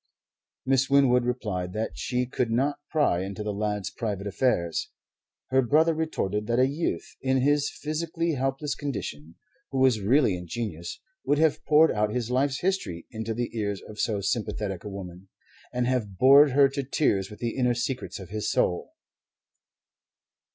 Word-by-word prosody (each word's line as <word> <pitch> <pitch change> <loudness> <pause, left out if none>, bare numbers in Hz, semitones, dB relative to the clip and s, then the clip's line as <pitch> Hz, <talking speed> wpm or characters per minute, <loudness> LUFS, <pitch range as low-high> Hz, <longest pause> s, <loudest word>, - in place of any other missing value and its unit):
Miss 135 +1 +2
Winwood 130 -3 +4
replied 105 -8 -2
that 110 +1 -2
she 125 0 -1
could 125 -1 -1
not 135 +6 0
pry 145 - +2
into 100 +2 -5
the 105 -1 -2
lad's 105 -1 -2
private 105 -3 -4
affairs. 100 -6 0 0.6
Her 130 0 +5
brother 155 +6 +3
retorted 105 -10 -2
that 120 0 +1
a 130 - +5
youth, 145 +5 -3
in 130 0 +1
his 145 +1 +2
physically 160 +4 -2
helpless 135 +2 -1
condition, 85 - -5 0.3
who 135 - -4
was 130 -5 +3
really 120 0 +3
ingenuous, 90 -1 -5 0.2
would 145 - +2
have 155 0 +2
poured 155 +1 +5
out 105 0 +1
his 125 0 -2
life's 135 +1 +1
history 175 - -2
into 110 0 -4
the 120 0 -3
ears 100 -3 -2
of 105 0 -11
so 105 -3 0
sympathetic 100 -2 -2
a 105 - -6
woman, 95 -1 -9 0.4
and 125 0 0
have 115 -7 -1
bored 140 +5 +7
her 140 0 +6
to 140 +1 -3
tears 125 -8 0
with 105 - -10
the 120 -1 -3
inner 125 -2 +2
secrets 125 +2 -3
of 95 -3 -10
his 105 +1 -2
soul. 90 - 0
120 Hz, 165 wpm, -26 LUFS, 105-140 Hz, 0.6 s, bored